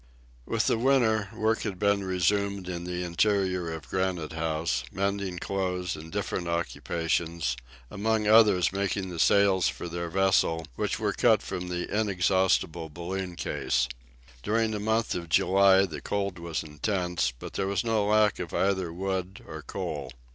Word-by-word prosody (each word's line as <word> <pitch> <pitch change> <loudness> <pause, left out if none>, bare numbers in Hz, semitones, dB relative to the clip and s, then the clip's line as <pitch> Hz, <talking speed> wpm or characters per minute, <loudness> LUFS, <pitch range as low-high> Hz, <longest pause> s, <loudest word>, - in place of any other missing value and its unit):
With - - 0
the 115 - +2
winter, 115 -5 +3
work 110 +1 0
had 100 -4 -3
been 100 0 +2
resumed 95 +1 0
in 85 -1 -4
the 90 0 -3
interior 90 -1 +1
of 80 -5 -7
Granite 90 -1 -2
House, 80 -5 -1
mending 100 -1 -2
clothes 90 -1 -2
and 80 +1 -10
different 95 -3 -2
occupations, 85 -3 -1 0.4
among 110 +1 0
others 105 -5 +5
making 95 -1 -1
the 85 - -6
sails 100 -2 +4
for - - -4
their 85 0 -4
vessel, 90 -3 +2
which - - -1
were - - 0
cut - - +3
from 90 0 -4
the 90 0 -3
inexhaustible 95 -5 +1
balloon 90 +3 -5
case. 65 -6 0 0.5
During 110 - +1
the 105 - -2
month 110 +2 0
of 85 -2 -5
July 95 +3 +5
the 80 -5 -7
cold 100 -3 -2
was 85 -1 -3
intense, 90 - -1
but - - -9
there 95 - -1
was 100 -1 0
no 115 -2 +1
lack 105 0 +3
of 85 -2 -5
either 95 -3 +1
wood 95 +1 -3
or - - -8
coal. - - -5
95 Hz, 155 wpm, -28 LUFS, 85-100 Hz, 0.5 s, others